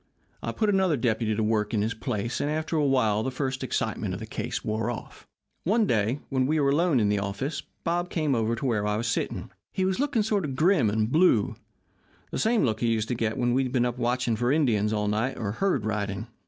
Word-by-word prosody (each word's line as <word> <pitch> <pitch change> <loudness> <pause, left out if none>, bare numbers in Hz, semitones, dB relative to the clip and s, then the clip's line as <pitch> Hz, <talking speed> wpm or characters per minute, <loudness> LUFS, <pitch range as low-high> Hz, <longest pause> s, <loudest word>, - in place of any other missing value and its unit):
I - - -3
put 215 -2 +1
another 190 -6 +2
deputy 115 -2 0
to 110 - 0
work 105 0 0
in 105 - +2
his 110 +1 -1
place, 115 0 -3
and 145 - 0
after 155 +2 -2
a 155 - +2
while, 120 -7 +2
the 130 - -1
first 130 0 -3
excitement - - -2
of - - -6
the - - -6
case - - -4
wore 110 +1 -1
off. 120 - -7 0.4
"One 215 +5 +3
day 115 - +1
when 130 -2 +1
we 155 +2 +2
were 140 -1 +3
alone 160 -2 +3
in 105 - +2
the 105 -1 +1
office 100 +10 -3 0.2
Bob 175 +1 0
came 155 -4 0
over 115 -1 +1
to 120 - -5
where 105 -5 +1
I 105 0 0
was 115 - -2
sitting. 115 - -2 0.2
He 190 - 0
was 190 +3 0
looking 275 -6 +1
sort 205 -2 0
of 135 -4 -3
grim 155 - +3
and 110 +2 0
blue 155 - +4 0.8
the - - -2
same 225 0 +2
look 110 -3 0
he 120 - +1
used 115 -1 0
to - - +1
get 115 -2 -1
when 120 0 +1
he'd 130 -1 +1
been 125 -2 +2
up 125 0 -3
watching 120 -1 +1
for 120 +3 +1
Indians 115 -9 +2
all 105 -1 0
night 110 +6 0
or 100 -3 -2
herd 140 - 0
riding. 105 -1 -2
120 Hz, 235 wpm, -27 LUFS, 110-150 Hz, 0.8 s, blue